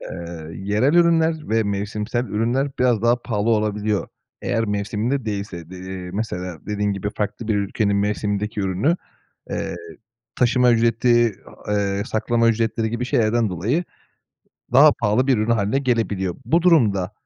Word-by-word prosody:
eee, 85 -2 -7
yerel 105 - +1
ürünler 165 -2 +3
ve 110 0 +2
mevsimsel 105 +4 -2
ürünler 125 +6 0
biraz 120 -4 +2
daha 120 +1 +2
pahalı 105 +2 -1
olabiliyor. 105 -1 0 0.3
Eğer 115 0 0
mevsiminde 105 +6 -1
değilse. 100 -5 -5
De 95 - -9
eee, 95 -1 -7
mesela 90 -5 -4
dediğin 105 -1 -1
gibi 100 +1 -3
farklı 105 +2 -3
bir 110 - +2
ülkenin 100 0 0
mevsimindeki 105 +1 -1
ürünü, 95 - +1 0.5
eee, - - -3 0.6
taşıma 125 0 +3
ücreti, 115 -1 +3 0.3
a 105 - 0
eee 100 -1 0
saklama 115 +1 +1
ücretleri 110 0 0
gibi 120 +2 -3
şeylerden 115 -2 +1
dolayı 110 - -1 0.9
daha 145 +3 +8
pahalı 115 +3 +1
bir 130 -4 +3
ürün 110 +2 0
hâline 110 +3 +1
gelebiliyor. 105 -8 -1
Bu 170 +1 +2
durumda, 105 - +3
110 Hz, 145 wpm, -22 LUFS, 100-120 Hz, 0.9 s, daha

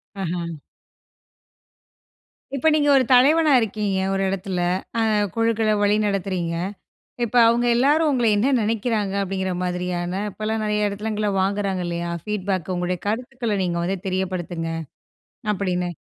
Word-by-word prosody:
அஹா. 175 -3 -3 2.1
இப்ப 275 - 0
நீங்க 290 -1 +3
ஒரு 260 - +4
தலைவனா 295 +4 +5
இருக்கீங்க, 210 -2 -1 0.2
ஒரு 195 - 0
எடத்துல. 190 -1 -2 0.5
அ 210 -1 +2
குழுக்கள 225 -1 +2
வழி 205 0 +3
நடத்துறீங்க. 185 -4 -1 0.7
இப்ப 235 +1 -3
அவுங்க 240 +1 +2
எல்லாரும் 295 +6 +3
உங்கள 250 -4 +1
என்ன 250 +7 +2
நெனைக்கிறாங்க 215 -2 -1
அப்டிங்கிற 190 -1 -2
மாதிரியான, 180 -1 -2 0.2
இப்பலாம் 215 +2 -3
நெறைய 210 0 +1
எடத்துலங்கள்ல 210 +1 -2
வாங்குறாங்க 195 -1 0
இல்லையா? 170 0 -3
ஃபீட்பேக்கு 190 -4 -2
"உங்களுடைய 180 0 -2
கருத்துக்கள 235 0 -2
நீங்க 170 -1 -1
வந்து 190 +3 -1
தெரியப்படுத்துங்க" 185 -3 -2 0.8
அப்டின்னு. 180 -3 -1
200 Hz, 120 wpm, -23 LUFS, 185-225 Hz, 2.1 s, தலைவனா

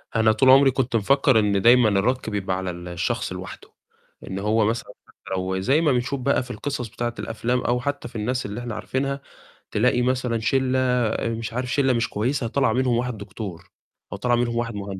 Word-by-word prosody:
أنا 110 -1 +4
طول 130 +4 +3
عمري 135 0 +7
كنت 130 -2 -1
مفكّر 130 +2 +3
إن 100 -2 +1
دايمًا 120 -1 +6
الرَك 110 +5 0
بيبقى 95 -3 -2
على 95 -1 -3
ال 85 +1 -9
الشخص 85 -1 -2
لوحده. - - -9 0.5
إن 95 +1 -4
هو 105 +1 +2
مثلًا 115 +2 -2
حتّى - - -24 0.2
لو 95 0 -2
زي 135 +11 +2
ما 150 -4 +3
بنشوف 130 +2 -1
بقى 135 0 +1
في 125 - -9
القصص 130 -3 -4
بتاعة 120 +2 -4
الأفلام، 120 +2 -1
أو 120 +1 0
حتّى 140 -2 -3
في 120 - -16
الناس 125 +4 -2
اللي 105 +3 -5
إحنا 120 -3 -5
عارفينها، 140 +1 -2 0.5
تلاقي 125 +3 +2
مثلًا 125 -2 0
شِلّة 130 +2 +1
آآ 125 -3 +1
مش 115 0 -4
عارف 125 0 -3
شِلّة 135 -3 +3
مش 115 -3 0
كويسة 120 +4 -1
طلع 130 -2 +1
منهم 125 -2 +1
واحد 125 -2 -2
دكتور، 100 -3 -8 0.4
أو - - -5
طلع 120 -1 +1
منهم 120 -1 0
واحد 115 -1 -2
مهن 100 -1 -5
120 Hz, 205 wpm, -23 LUFS, 110-130 Hz, 0.5 s, عمري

